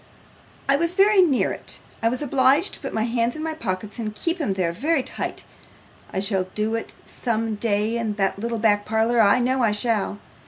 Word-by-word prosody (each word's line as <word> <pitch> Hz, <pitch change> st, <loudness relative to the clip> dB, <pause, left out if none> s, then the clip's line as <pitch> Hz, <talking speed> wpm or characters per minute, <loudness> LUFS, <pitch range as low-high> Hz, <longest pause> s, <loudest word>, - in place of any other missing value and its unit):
'I 275 Hz, 0 st, +4 dB
was 335 Hz, +3 st, -1 dB
very 395 Hz, 0 st, +6 dB
near 295 Hz, -8 st, +2 dB
it. -, -, -7 dB, 0.2 s
I 230 Hz, -, +3 dB
was 250 Hz, +4 st, -2 dB
obliged 275 Hz, +5 st, +3 dB
to -, -, -4 dB
put -, -, -5 dB
my 220 Hz, -, 0 dB
hands 235 Hz, 0 st, 0 dB
in 310 Hz, -, -5 dB
my 320 Hz, 0 st, -2 dB
pockets, 210 Hz, -5 st, -4 dB
and 215 Hz, -2 st, -4 dB
keep 335 Hz, -, -2 dB
'em 205 Hz, -10 st, 0 dB
there 185 Hz, -3 st, 0 dB
very 280 Hz, -, 0 dB
tight. -, -, -5 dB, 0.7 s
I -, -, -2 dB
shall 195 Hz, -1 st, 0 dB
do 215 Hz, +1 st, 0 dB
it 230 Hz, -, -3 dB
some 225 Hz, -2 st, -2 dB
day 215 Hz, +1 st, 0 dB
in 220 Hz, -3 st, -2 dB
that 195 Hz, -1 st, 0 dB
little 230 Hz, +2 st, -2 dB
back 210 Hz, -2 st, +3 dB
parlour, 225 Hz, +2 st, +2 dB
I 200 Hz, +2 st, +5 dB
know 255 Hz, +1 st, +1 dB
I 220 Hz, -3 st, +3 dB
shall. 210 Hz, -2 st, 0 dB
230 Hz, 205 wpm, -23 LUFS, 210-265 Hz, 0.7 s, very